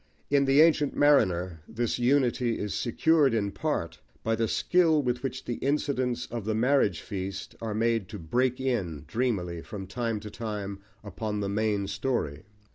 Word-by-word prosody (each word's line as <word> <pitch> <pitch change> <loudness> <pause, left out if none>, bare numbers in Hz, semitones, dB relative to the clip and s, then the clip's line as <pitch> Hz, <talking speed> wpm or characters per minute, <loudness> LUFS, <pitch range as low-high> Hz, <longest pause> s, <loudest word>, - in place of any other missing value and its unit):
In 140 -1 +4
The 135 +2 +5
Ancient 155 -3 +4
Mariner 95 - +3
this 120 +1 -2
unity 125 -2 +2
is 105 -4 -3
secured 140 - +3
in 100 -2 0
part 85 - -2 0.2
by 115 0 +1
the 115 0 0
skill 165 +4 +3
with 125 -1 -1
which 130 0 -4
the 120 - -3
incidents 130 -4 0
of 115 -2 -3
the 110 +1 -1
marriage 115 - +2
feast 95 -1 -5
are 110 -2 -3
made 115 -3 +1
to 105 - -6
break 125 +9 0
in 100 - -2
dreamily 95 -9 -1
from 100 0 -7
time 115 +2 -2
to 105 -1 -8
time 105 -4 -5 0.2
upon 105 +1 -4
the 100 -1 -2
main 105 -1 0
story. 100 - -2
115 Hz, 165 wpm, -28 LUFS, 100-130 Hz, 0.2 s, The